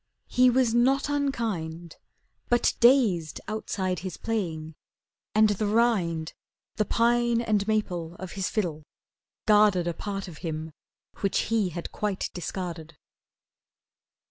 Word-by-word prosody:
He 250 0 +5
was 250 -2 +2
not 265 +4 +3
unkind, 205 - -2 0.5
But 240 0 +3
dazed 225 - +4
outside 190 -4 -2
his 185 0 -6
playing, 165 -8 -3 0.6
and 215 0 +6
the 210 +1 0
rind, 195 -8 +1 0.4
The 215 - +2
pine 235 +1 +2
and 215 -3 0
maple 180 -6 -1
of 185 0 -8
his 195 -1 -2
fiddle, 170 -8 -2 0.6
guarded 210 -4 +5
A 170 - -1
part 195 +2 -5
of 165 -4 -10
him 160 -1 -4 0.5
which 200 +2 0
he 215 -5 +2
had 170 0 -6
quite 205 -2 -2
discarded. 170 -3 -5
200 Hz, 120 wpm, -27 LUFS, 170-230 Hz, 0.6 s, and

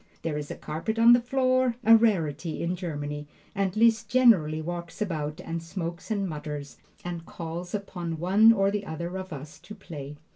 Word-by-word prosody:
There 165 -2 -2
is 150 -1 -4
a - - -5
carpet 165 +9 -4
on 230 +1 +8
the 240 - +5
floor, 255 0 +2
a 225 0 +8
rarity 170 -9 +1
in 175 +2 -1
Germany, 150 -4 -5 0.3
and 195 0 -1
Liszt 225 0 +3
generally 195 -12 +4
walks 170 +1 -6
about 155 -7 -3
and 165 0 -4
smokes 170 +1 -6
and 200 -3 0
mutters, 150 -3 -6 0.3
and 175 -2 -4
calls 170 +3 -6
upon 175 -5 -4
one 195 +7 +6
or 195 -3 +2
the 205 -1 -3
other 170 +3 -5
of 190 0 -6
us 150 +1 -8
to 180 +6 -11
play. 150 -7 -8
175 Hz, 180 wpm, -27 LUFS, 155-210 Hz, 0.3 s, on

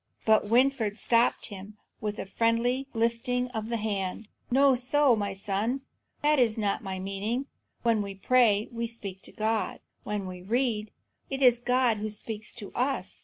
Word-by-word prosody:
But 220 -1 +4
Winfried 235 -3 +2
stopped 235 0 +3
him 200 +1 -9 0.2
with 210 -1 -3
a - - -4
friendly 230 +6 +1
lifting 240 +2 0
of 220 -2 -4
the 235 - 0
hand. 205 -1 -3 0.2
"No 275 +2 +5
so, 260 +1 +3
my 200 -2 -2
son; 210 +7 -1 0.4
that 300 -1 +4
was 230 -3 +3
not 205 -2 0
my 190 -2 -4
meaning. 200 +7 -2 0.4
When 230 -3 +3
we 200 -1 -5
pray, 215 -1 +3
we 235 0 -3
speak 200 -5 -6
to - - -11
God; 220 0 -1 0.2
when 210 -2 -3
we 180 -1 -7
read, 220 +1 0 0.4
it 270 0 -2
is 245 -2 +6
God 245 -2 +2
who 215 +1 -3
speaks 210 0 -6
to 210 -5 -9
us. 250 -5 -2
225 Hz, 170 wpm, -28 LUFS, 205-245 Hz, 0.4 s, is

